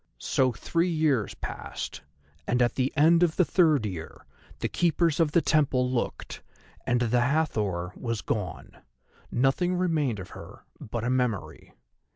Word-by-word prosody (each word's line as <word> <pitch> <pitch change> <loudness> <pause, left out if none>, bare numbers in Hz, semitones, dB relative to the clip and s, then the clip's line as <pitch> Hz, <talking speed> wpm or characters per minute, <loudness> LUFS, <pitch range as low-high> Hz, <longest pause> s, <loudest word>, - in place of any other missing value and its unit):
So 130 -1 +1
three 170 +8 -1
years 155 - +1
passed, - - -6 0.5
and 125 - +1
at 120 - +1
the 130 +1 0
end 165 +3 +5
of 170 -3 +3
the 180 - +3
third 155 - +3
year 90 -6 -7 0.3
the - - -2
keepers 170 -2 +1
of 160 -3 +3
the 170 - +4
temple 130 -5 +2
looked 120 -2 -3 0.5
and 120 0 +2
the 120 +1 +2
Hathor 105 - 0
was 115 -3 -4
gone. 105 -5 -4 0.5
Nothing 135 +9 +1
remained 160 - 0
of 95 -2 -8
her - - -11 0.2
but 115 +1 -5
a 120 - 0
memory. 125 - -2
130 Hz, 150 wpm, -27 LUFS, 115-160 Hz, 0.5 s, end